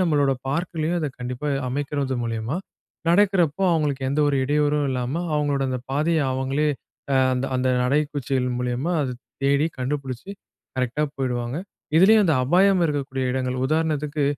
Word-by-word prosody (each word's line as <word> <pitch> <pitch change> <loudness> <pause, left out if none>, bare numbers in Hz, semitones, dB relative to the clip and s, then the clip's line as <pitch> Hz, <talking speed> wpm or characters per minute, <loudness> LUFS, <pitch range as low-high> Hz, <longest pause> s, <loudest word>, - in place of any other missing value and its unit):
நம்முளுடைய 145 -6 +2
பார்க்‌லயும் 165 +2 -1
அதை 150 - -1
கண்டிப்பா 125 +4 -4 0.2
அமைக்கிறது 140 0 -2
மூலியமா, 115 +5 -2 0.5
நடக்கிறப்போ 185 -3 +3
அவங்களுக்கு 145 -4 0
எந்த 150 +2 +1
ஒரு 140 - +1
இடையூறும் 150 0 +1
இல்லாம 130 +6 -2
அங்ககளுடைய 140 -2 0
அந்த 125 -1 -2
பாதைய 155 +3 +1
அவுங்களே, 135 +3 0 0.4
அ - - +4 0.2
அந்த 125 +1 -1
அந்த 130 0 +1 0.2
நடைக்குச்சிகள் 135 -2 0
மூலியமா 125 +7 -1
அத 125 -3 -3 0.3
தேடி 140 +2 +3
கண்டுபிடிச்சு 135 +4 -4 0.5
கரெக்ட்‌டா 130 +4 0
போய்டுவாங்க. 125 0 -2 0.4
இதிலயும் 210 +3 +6
அந்த 160 - +3
அபாயம் 185 +4 +4
இருக்கக்கூடிய 135 -3 -2
எடங்கள் 130 -1 -1
உதாரணத்திற்கு 150 -1 0
145 Hz, 135 wpm, -23 LUFS, 130-155 Hz, 0.5 s, இதிலயும்